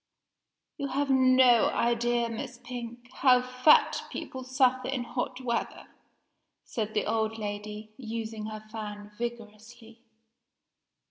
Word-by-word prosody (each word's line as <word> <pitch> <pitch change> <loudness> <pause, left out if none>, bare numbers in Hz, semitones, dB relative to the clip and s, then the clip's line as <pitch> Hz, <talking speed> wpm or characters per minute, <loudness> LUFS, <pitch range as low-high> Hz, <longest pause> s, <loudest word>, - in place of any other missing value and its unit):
"You 280 -2 -2
have 275 +1 0
no 255 -2 +6
idea, 240 0 +1
Miss 230 +2 -6
Pink, 240 0 -8
how 255 -2 +5
fat 255 +4 +4
people 260 0 -6
suffer 255 0 +2
in 260 -2 -1
hot 250 +1 -4
weather," 235 -2 -3 0.8
said 215 -1 -4
the 210 - +1
old 220 0 0
lady, 210 0 -6
using 225 -3 -5
her 215 0 -7
fan 210 -2 -7
vigorously. 230 0 -7
235 Hz, 115 wpm, -29 LUFS, 220-255 Hz, 0.8 s, no